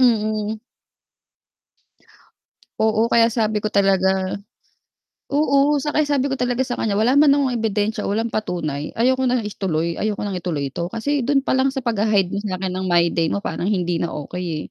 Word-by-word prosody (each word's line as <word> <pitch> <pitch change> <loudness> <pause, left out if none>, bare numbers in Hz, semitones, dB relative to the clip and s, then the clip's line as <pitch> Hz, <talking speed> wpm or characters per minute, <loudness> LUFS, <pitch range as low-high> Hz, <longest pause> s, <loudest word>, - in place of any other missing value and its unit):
mm. 215 -3 +1 2.2
Oo, 220 0 +3
kaya 230 -1 +5
sabi 215 -2 0
ko 215 - -1
talaga 190 -1 +1 0.9
oo 280 0 +2
'tsaka 300 +1 0
sabi 280 -1 0
ko 270 - -2
talaga 245 +1 0
sa 250 -2 -4
kanya 210 -3 0
wala 235 +7 +3
man 290 -1 +6
akong 280 -2 +1
ebidensiya 215 0 -1
walang 225 +3 -1
patunay, 155 -9 -3
ayoko 260 +3 +2
na 250 -1 +1
ituloy, 170 -5 -2
ayoko 210 -1 -2
nang 200 -3 -3
ituloy 155 -6 -3
ito. 170 +5 -4
Kasi 245 +6 -2
do'n 275 -1 +2
pa - - -3
lang 265 0 +1
sa 265 - -3
pag-ha-hide 210 -5 +1
mo 200 - -3
sa 205 -2 -3
akin 185 0 -3
ng 185 +1 -3
my 170 -1 +3
day 165 -1 0
mo 200 - -2
parang 175 - -3
hindi 180 -4 0
na 170 - -3
okey, 160 +1 -5
215 Hz, 175 wpm, -21 LUFS, 185-250 Hz, 2.2 s, man